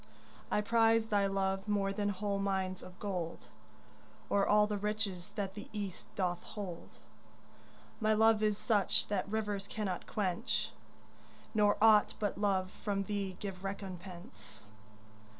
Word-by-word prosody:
I 210 - +2
prize 225 0 +3
thy 200 -1 +3
love 195 0 0
more 200 -1 +1
than 205 0 0
whole 200 0 -1
mines 190 -2 -1
of 180 0 -11
gold 180 -6 -4 0.8
Or 200 -1 +3
all 210 0 +6
the 210 -1 -2
riches 205 -4 -2
that 195 -2 -2
the 205 0 -8
East 200 -4 -5
doth 180 -2 0
hold. 190 -5 -7 1.0
My 215 -1 +3
love 220 0 +5
is 210 -1 +2
such 210 -5 +1
that 200 -1 -1
rivers 205 -2 -2
cannot 200 -5 -3
quench, 210 +3 -1 0.8
Nor 210 -2 +4
aught 215 -1 +6
but 205 -1 -1
love 190 -2 +1
from 200 -2 -2
thee 195 -2 -3
give 195 -2 -6
recompense. 180 - -8
200 Hz, 135 wpm, -34 LUFS, 190-210 Hz, 1.0 s, all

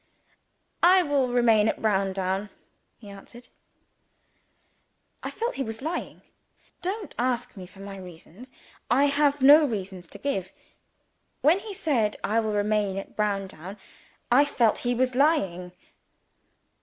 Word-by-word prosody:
"I 365 +2 +6
will 285 -4 +1
remain 235 -3 +3
at - - -1
Browndown," 195 -1 -1 0.5
he 215 - -15
answered. 235 +5 -13 1.7
I - - -4
felt 475 +2 -3
he 270 - -3
was 225 +2 -7
lying. 330 +3 -5 0.6
Don't 395 +3 -4
ask 245 0 -1
for 190 0 -12
my 195 0 -8
reasons: 185 +6 -12 0.4
I 265 +5 +4
have 285 -1 +1
no 295 +3 +8
reasons 190 -6 -5
to - - -10
give. 195 -10 -3 0.9
When 320 +7 +4
he 405 -1 -8
said 235 - 0
"I 220 +2 +1
will 220 -1 -1
remain 205 -1 0
at 195 - -7
Browndown," 195 -3 -3 0.5
I 265 +4 +6
felt 240 -6 +1
he 245 0 -1
was 255 +1 +1
lying. 195 - +1
225 Hz, 130 wpm, -26 LUFS, 195-280 Hz, 1.7 s, no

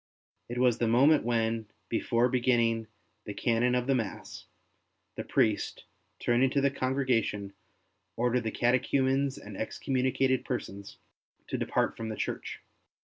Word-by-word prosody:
It 120 - -4
was 125 -2 +3
the 120 - +1
moment 140 +7 +5
when, 115 -2 0 0.2
before 115 +1 +1
beginning 120 -3 +1 0.4
the - - -6
Canon 120 +2 +1
of 125 0 0
the 135 - +2
Mass, 110 - -4 0.7
the - - -4
priest, 105 -2 0 0.3
turning 120 +2 +2
to 140 - +1
the 140 0 +2
congregation, 130 -7 -1 0.6
ordered 125 +1 +1
the - - +1
catechumens 130 +3 +1
and 105 -1 -10
excommunicated 130 +3 0
persons 100 -6 -5 0.5
to - - -1
depart - - 0
from 115 -1 -5
the 110 - -4
church. - - -4
120 Hz, 135 wpm, -29 LUFS, 115-130 Hz, 0.7 s, moment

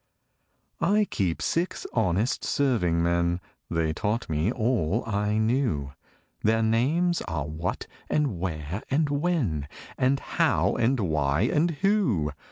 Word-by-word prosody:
I 205 +5 +3
Keep 95 - -1
six 170 +2 -1
honest 105 +1 +1
serving 95 -12 +1
men: 85 0 +1 0.3
(They 80 -2 0
taught 110 +7 -1
me 80 +7 +1
all 115 -5 0
I 105 0 0
knew) 110 - 0 0.5
Their 110 +1 +2
names 150 +11 +2
are 75 -2 -2
What 80 +4 -3 0.2
and 140 - 0
Where 85 +1 -3
and 145 +2 +2
When 140 - 0 0.3
And 130 +2 +3
How - - +1
and 125 +1 +2
Why 75 -4 +1
and 150 +9 +2 0.2
Who. 125 - +2
110 Hz, 125 wpm, -26 LUFS, 85-135 Hz, 0.5 s, I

